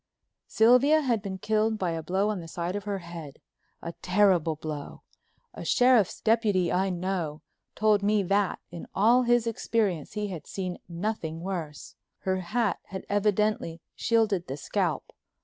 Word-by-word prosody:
Sylvia 250 Hz, +7 st, +5 dB
had 240 Hz, -7 st, 0 dB
been 195 Hz, -2 st, -5 dB
killed 215 Hz, +3 st, +1 dB
by 180 Hz, -4 st, -1 dB
a 165 Hz, 0 st, -3 dB
blow 190 Hz, +6 st, 0 dB
on 210 Hz, -3 st, -2 dB
the 165 Hz, -, -8 dB
side 170 Hz, +3 st, -3 dB
of 205 Hz, -1 st, -4 dB
her 200 Hz, -1 st, -2 dB
head—a 170 Hz, -1 st, -11 dB
terrible 180 Hz, -4 st, +3 dB
blow. 150 Hz, -2 st, -7 dB, 0.5 s
A -, -, -8 dB
sheriff's 245 Hz, -6 st, +3 dB
deputy 215 Hz, -6 st, +2 dB
I 190 Hz, +2 st, +1 dB
know 175 Hz, -4 st, -3 dB, 0.3 s
told 210 Hz, -1 st, +3 dB
me 205 Hz, 0 st, +2 dB
that 195 Hz, +1 st, +1 dB
in 170 Hz, -1 st, -8 dB
all 230 Hz, +5 st, +5 dB
his 240 Hz, -1 st, +3 dB
experience 215 Hz, -7 st, -1 dB
he 210 Hz, -1 st, -2 dB
had 170 Hz, -6 st, -7 dB
seen 185 Hz, -2 st, -4 dB
nothing 170 Hz, -3 st, -3 dB
worse. 170 Hz, -6 st, -5 dB, 0.3 s
Her 190 Hz, 0 st, 0 dB
hat 210 Hz, +5 st, -1 dB
had 190 Hz, 0 st, -7 dB
evidently 205 Hz, -4 st, +1 dB, 0.2 s
shielded 215 Hz, -6 st, +1 dB
the 135 Hz, +2 st, -4 dB
scalp. -, -, -2 dB
195 Hz, 150 wpm, -27 LUFS, 170-215 Hz, 0.5 s, Sylvia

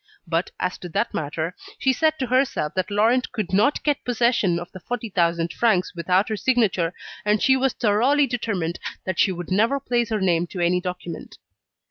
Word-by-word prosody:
But 165 Hz, +1 st, -1 dB
as 180 Hz, 0 st, -2 dB
to 180 Hz, -, -7 dB
that -, -, -1 dB
matter, 160 Hz, +3 st, -3 dB, 0.2 s
she 265 Hz, -, +2 dB
said 315 Hz, +4 st, +1 dB
to 265 Hz, -, -1 dB
herself 255 Hz, -, 0 dB
that 185 Hz, +1 st, -1 dB
Laurent 225 Hz, +5 st, +2 dB
could 205 Hz, -5 st, -4 dB
not 215 Hz, +9 st, +2 dB
get 290 Hz, -2 st, 0 dB
possession 235 Hz, -7 st, +2 dB
of 175 Hz, 0 st, -7 dB
the 185 Hz, -, -10 dB
40,000 175 Hz, -7 st, -1 dB
francs 215 Hz, -6 st, +1 dB
without 180 Hz, +4 st, +1 dB
her 215 Hz, -, -1 dB
signature, 205 Hz, -8 st, +1 dB, 0.3 s
and 210 Hz, +1 st, +2 dB
she 265 Hz, -, +4 dB
was 265 Hz, -1 st, +1 dB
thoroughly 250 Hz, +7 st, +3 dB
determined 205 Hz, -10 st, -2 dB, 0.3 s
that 185 Hz, -1 st, -3 dB
she 195 Hz, -, +4 dB
would 175 Hz, 0 st, -6 dB
never 225 Hz, +8 st, +2 dB
place 240 Hz, -3 st, 0 dB
her 215 Hz, -2 st, 0 dB
name 175 Hz, -3 st, +1 dB
to 180 Hz, -, -7 dB
any 175 Hz, +1 st, +2 dB
document. 180 Hz, -2 st, -6 dB
205 Hz, 185 wpm, -23 LUFS, 175-245 Hz, 0.3 s, she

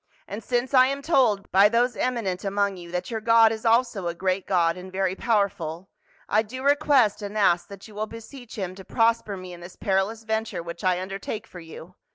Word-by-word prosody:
And 210 Hz, +3 st, -7 dB
since 245 Hz, +4 st, -1 dB
I 255 Hz, -1 st, +7 dB
am 275 Hz, +1 st, -3 dB
told 245 Hz, -11 st, +2 dB
by 200 Hz, +2 st, +6 dB
those 240 Hz, +2 st, +1 dB
emi 250 Hz, -2 st, -1 dB
nent 185 Hz, -2 st, -3 dB
among 200 Hz, 0 st, 0 dB
you 175 Hz, -1 st, -10 dB
that 180 Hz, +6 st, -4 dB
your 220 Hz, -1 st, -3 dB
God 230 Hz, 0 st, +5 dB
is 225 Hz, +1 st, -3 dB
also 230 Hz, -5 st, +2 dB
a 170 Hz, -, -3 dB
great 185 Hz, +1 st, -1 dB
God 170 Hz, -3 st, +2 dB
and 185 Hz, +1 st, -10 dB
very 190 Hz, -1 st, 0 dB
powerful, 190 Hz, -6 st, -1 dB, 0.4 s
I 215 Hz, -, +3 dB
do 255 Hz, +4 st, -8 dB
request 280 Hz, -7 st, +3 dB
and 205 Hz, +1 st, -5 dB
ask 175 Hz, -4 st, +3 dB
that 200 Hz, +1 st, -11 dB
you 215 Hz, -, -15 dB
will 215 Hz, +1 st, -3 dB
beseech 230 Hz, +2 st, -11 dB
him 185 Hz, -3 st, -3 dB
to 190 Hz, +1 st, -11 dB
prosper 225 Hz, -2 st, +1 dB
me 185 Hz, -1 st, -9 dB
in 175 Hz, -, -11 dB
this 175 Hz, +1 st, -11 dB
perilous 200 Hz, +2 st, -1 dB
venture 220 Hz, -4 st, -3 dB
which 170 Hz, 0 st, -8 dB
I 180 Hz, -1 st, +2 dB
undertake 195 Hz, +3 st, -5 dB
for 180 Hz, -, -12 dB
you. 165 Hz, +1 st, -11 dB
205 Hz, 215 wpm, -25 LUFS, 185-230 Hz, 0.4 s, I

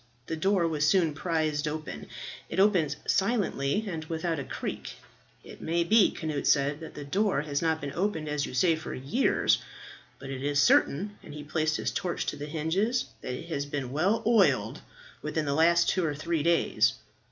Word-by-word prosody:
The 160 Hz, -, -3 dB
door 185 Hz, +1 st, +2 dB
was 155 Hz, -2 st, +1 dB
soon 165 Hz, -1 st, +3 dB
prised 155 Hz, -2 st, -1 dB
open. 155 Hz, 0 st, -5 dB, 0.4 s
It -, -, -2 dB
opened 180 Hz, -8 st, +3 dB
silently 200 Hz, -, +1 dB
and 165 Hz, -4 st, -4 dB
without 165 Hz, 0 st, -2 dB
a -, -, -3 dB
creak. 60 Hz, -, -5 dB, 0.5 s
"It -, -, -12 dB
may 170 Hz, +1 st, +1 dB
be," 210 Hz, +4 st, +5 dB
Cnut 155 Hz, -3 st, -3 dB
said, 145 Hz, +1 st, +2 dB
"that 160 Hz, -, -9 dB
the 145 Hz, -, -7 dB
door 195 Hz, +1 st, +1 dB
has 145 Hz, -2 st, -2 dB
not 160 Hz, -1 st, +1 dB
been 140 Hz, -2 st, -5 dB
opened 175 Hz, -4 st, -1 dB
as 150 Hz, -1 st, -1 dB
you -, -, -7 dB
say 165 Hz, +5 st, +4 dB
for 160 Hz, -, -6 dB
years, 140 Hz, -, +2 dB, 0.6 s
but 135 Hz, 0 st, -8 dB
it 130 Hz, -1 st, -5 dB
is 145 Hz, +1 st, +1 dB
certain," 190 Hz, +7 st, +3 dB
and -, -, -11 dB
he 150 Hz, -, -7 dB
placed 155 Hz, +1 st, 0 dB
his -, -, -2 dB
torch 175 Hz, -2 st, -2 dB
to -, -, -2 dB
the 145 Hz, +1 st, -6 dB
hinges, 175 Hz, +11 st, 0 dB, 0.2 s
"that 125 Hz, -, -4 dB
it 165 Hz, +6 st, -9 dB
has 145 Hz, -3 st, -2 dB
been 140 Hz, -3 st, -4 dB
well 185 Hz, +10 st, +1 dB
oiled 225 Hz, -3 st, +3 dB, 0.4 s
within 155 Hz, -1 st, -2 dB
the 140 Hz, -, 0 dB
last 170 Hz, +3 st, +4 dB
two 185 Hz, -, +1 dB
or 150 Hz, -3 st, -1 dB
three 160 Hz, +1 st, -1 dB
days. 170 Hz, +2 st, +3 dB
160 Hz, 190 wpm, -28 LUFS, 145-175 Hz, 0.6 s, be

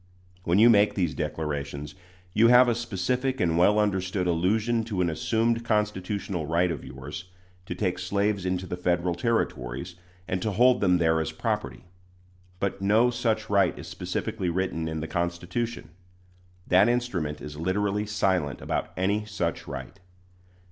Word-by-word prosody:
When 85 Hz, +2 st, +2 dB
you 110 Hz, +3 st, +7 dB
make 105 Hz, -3 st, +5 dB
these 85 Hz, -5 st, 0 dB
declarations, 75 Hz, -2 st, -4 dB, 0.4 s
you 115 Hz, +2 st, +5 dB
have 125 Hz, +1 st, +7 dB
a 120 Hz, -, +3 dB
specific 125 Hz, +4 st, -1 dB
and 85 Hz, -2 st, +2 dB
well 95 Hz, +5 st, +4 dB
understood 95 Hz, -3 st, 0 dB
allusion 105 Hz, +7 st, +1 dB
to 105 Hz, -5 st, -3 dB
an 85 Hz, -2 st, +2 dB
assumed 115 Hz, +8 st, 0 dB
constitutional 100 Hz, -5 st, -1 dB
right 85 Hz, +2 st, +2 dB
of 75 Hz, -, -5 dB
yours 65 Hz, +6 st, -8 dB, 0.4 s
to 90 Hz, -, -4 dB
take 90 Hz, -2 st, -1 dB
slaves 100 Hz, +1 st, 0 dB
into 90 Hz, 0 st, -1 dB
the 90 Hz, -, -5 dB
Federal 90 Hz, 0 st, 0 dB
Territories, 85 Hz, -, -2 dB, 0.3 s
and 95 Hz, 0 st, -2 dB
to 110 Hz, -, 0 dB
hold 125 Hz, +4 st, +4 dB
them 90 Hz, -3 st, +4 dB
there 80 Hz, -1 st, +2 dB
as 80 Hz, -, -3 dB
property. -, -, -3 dB, 0.7 s
But 100 Hz, 0 st, -2 dB
no 110 Hz, +5 st, +4 dB
such 115 Hz, -2 st, -1 dB
right 100 Hz, -3 st, +2 dB
is -, -, -8 dB
specifically 90 Hz, +2 st, -3 dB
written 85 Hz, -2 st, -1 dB
in 80 Hz, -1 st, -3 dB
the 80 Hz, -, -4 dB
Constitution. 85 Hz, +5 st, -3 dB, 0.8 s
That 95 Hz, +5 st, +5 dB
instrument 95 Hz, -12 st, -1 dB
is 75 Hz, 0 st, -8 dB
literally 100 Hz, +5 st, 0 dB
silent 95 Hz, -9 st, 0 dB
about -, -, -3 dB
any 100 Hz, +3 st, 0 dB
such 95 Hz, -5 st, -3 dB
right. 100 Hz, -, -7 dB
95 Hz, 155 wpm, -26 LUFS, 85-105 Hz, 0.8 s, you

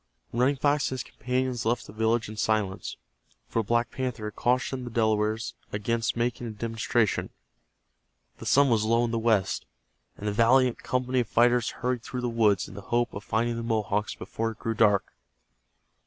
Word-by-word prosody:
Running 130 Hz, +4 st, +3 dB
Fox 145 Hz, +1 st, +2 dB
and 130 Hz, -, -4 dB
his -, -, -2 dB
companions 125 Hz, -1 st, -2 dB
left 120 Hz, +1 st, 0 dB
the -, -, -11 dB
village 110 Hz, +1 st, +1 dB
in 110 Hz, -, -8 dB
silence, 105 Hz, -3 st, -1 dB, 0.5 s
for 115 Hz, -, 0 dB
Black 120 Hz, +2 st, 0 dB
Panther 125 Hz, -4 st, -3 dB
had 105 Hz, -, -5 dB
cautioned 125 Hz, +1 st, 0 dB
the 120 Hz, -, -5 dB
Delawares 110 Hz, 0 st, 0 dB, 0.2 s
against 115 Hz, +3 st, -1 dB
making 120 Hz, 0 st, -1 dB
a -, -, -4 dB
demonstration. 115 Hz, 0 st, 0 dB, 1.1 s
The -, -, -7 dB
sun 140 Hz, -2 st, +5 dB
was 110 Hz, -2 st, +3 dB
low 115 Hz, +2 st, +3 dB
in 115 Hz, -, -2 dB
the 115 Hz, -, 0 dB
west, 110 Hz, -5 st, +1 dB, 0.5 s
and 105 Hz, -, -5 dB
the -, -, +1 dB
valiant 120 Hz, +3 st, +4 dB
company 130 Hz, 0 st, 0 dB
of 120 Hz, -, 0 dB
fighters 120 Hz, 0 st, +3 dB
hurried 125 Hz, -1 st, -2 dB
through 125 Hz, +2 st, -5 dB
the 125 Hz, -, -1 dB
woods 110 Hz, -5 st, +2 dB
in -, -, -11 dB
the 100 Hz, -, -8 dB
hope 120 Hz, +1 st, +1 dB
of 100 Hz, -, -6 dB
finding 115 Hz, +2 st, 0 dB
the -, -, -3 dB
Mohawks 110 Hz, -2 st, -1 dB
before 115 Hz, 0 st, -3 dB
it 110 Hz, -, -8 dB
grew 115 Hz, -, -2 dB
dark. 105 Hz, -3 st, +3 dB
115 Hz, 185 wpm, -27 LUFS, 110-125 Hz, 1.1 s, sun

